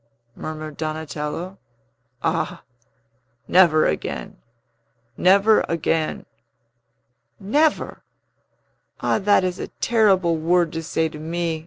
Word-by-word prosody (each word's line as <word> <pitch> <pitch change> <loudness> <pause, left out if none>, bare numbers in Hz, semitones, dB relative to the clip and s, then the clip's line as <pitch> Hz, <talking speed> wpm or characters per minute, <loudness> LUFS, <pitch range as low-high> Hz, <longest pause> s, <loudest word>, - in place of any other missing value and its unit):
murmured 155 -1 -7
Donatello. 155 +3 -5 0.6
"Ah, - - -1 0.8
never 170 -4 +5
again! 75 - -3 0.8
never 200 +4 +4
again!" 165 -1 -1 1.1
"Never? 295 +10 0 1.0
Ah, - - +1
that 205 -1 +3
is 185 0 -2
a - - -4
terrible 190 -7 +3
word 170 +1 +1
to 165 - -3
say 160 0 -1
to 155 -1 -9
me!" 165 0 -2
170 Hz, 95 wpm, -22 LUFS, 155-190 Hz, 1.1 s, never